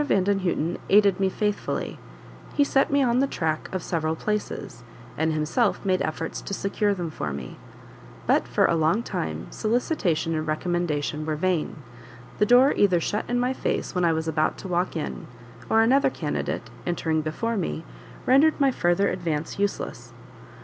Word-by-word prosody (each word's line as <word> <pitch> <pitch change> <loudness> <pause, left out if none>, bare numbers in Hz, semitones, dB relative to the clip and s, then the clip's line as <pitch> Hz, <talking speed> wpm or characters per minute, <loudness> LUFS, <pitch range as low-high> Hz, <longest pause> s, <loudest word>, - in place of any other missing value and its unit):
Vandenhuten 190 - +1
aided 200 -2 +5
me 190 -1 +2
faithfully; 210 +1 -2 0.6
he 290 - +5
set 270 -1 +2
me 280 0 +3
on 245 -1 +2
the 275 - +3
track 160 - -2
of 185 -3 -3
several 160 -2 -1
places, 185 - -4 0.3
and 160 +1 +1
himself 155 +10 0
made 185 -1 +2
efforts 160 +1 -3
to 200 - -4
secure 205 +2 0
them 175 -3 -4
for 75 - -4
me; 70 -3 -6 0.7
but - - +2
for - - +2
a - - +3
long 165 +8 +2
time 80 - -3
solicitation 215 - 0
and 155 0 -2
recommendation 155 -2 -1
were 155 0 -1
vain 165 -3 -1 0.6
the 210 - +4
door 250 +4 +6
either 185 -4 +4
shut 205 +5 -2
in 245 0 +1
my 250 +1 +1
face - - -2
when 180 -1 0
I 170 - +4
was 160 0 -2
about 155 -1 +1
to - - -8
walk 180 0 0
in, 160 - -4 0.4
or 225 - +5
another 265 +5 +4
candidate, - - -3
entering 160 -2 0
before 230 +10 -2
me, 170 -4 -3 0.4
rendered 290 +5 +5
my 275 -2 +4
further 175 -2 +2
advance 165 -2 -3
useless. 200 0 -3
180 Hz, 165 wpm, -25 LUFS, 160-210 Hz, 0.7 s, door